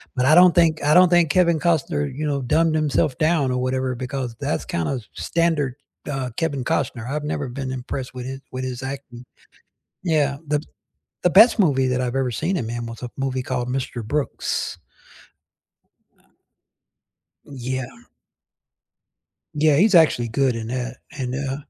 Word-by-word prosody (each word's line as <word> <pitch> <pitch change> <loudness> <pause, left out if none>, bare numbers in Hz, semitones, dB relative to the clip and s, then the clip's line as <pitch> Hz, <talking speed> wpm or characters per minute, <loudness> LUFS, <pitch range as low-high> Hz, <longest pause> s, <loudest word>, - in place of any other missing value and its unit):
but 125 - +1
I 150 - +5
don't 180 0 +7
think 160 -3 +3
I 150 +1 +4
don't 180 -1 +7
think 175 -3 +4
Kevin 170 -3 +3
Costner, 160 -3 +1
you 155 +3 -4
know, 140 -2 -1
dumbed 160 +6 +2
himself 150 -3 +1
down 155 -5 +2
or 125 - -1
whatever 130 0 -1
because 130 -2 -4
that's - - -2
kinda 85 +10 -2
s 120 -5 -8
standard, 160 -6 0 0.4
uh, 135 -2 -3
Kevin 145 -6 -1
Costner, 120 -3 -1
I've 150 +1 -2
never 145 -2 -3
been 130 +1 -5
impressed 130 +1 -5
with 125 - -6
his 135 +1 -6
with 130 0 -4
his 125 -1 -5
acting. 130 -2 -7 0.8
Yeah. 150 -5 +1
The 150 0 +1
b 155 - -13 0.6
the 180 - +5
best 220 +5 +7
movie 135 -8 +3
that 130 0 0
I've 125 +1 -2
ever 130 -2 0
seen 160 - -1
in 115 - -3
man 120 +1 -4
was 115 +1 -9
a 125 - -4
movie 130 -1 -2
called 125 -1 -2
Mr. 125 -3 -3
Brooks. 145 +5 -2 1.4
Uh. - - -31 1.2
Yeah. 130 -1 -4 1.7
Yeah, 150 -1 +3
he's 200 +3 +4
actually 150 -8 +5
good 130 +2 +1
in 115 0 -5
that 125 0 -4
and, 130 -2 -4
uh 135 0 -2
135 Hz, 170 wpm, -22 LUFS, 125-155 Hz, 1.7 s, don't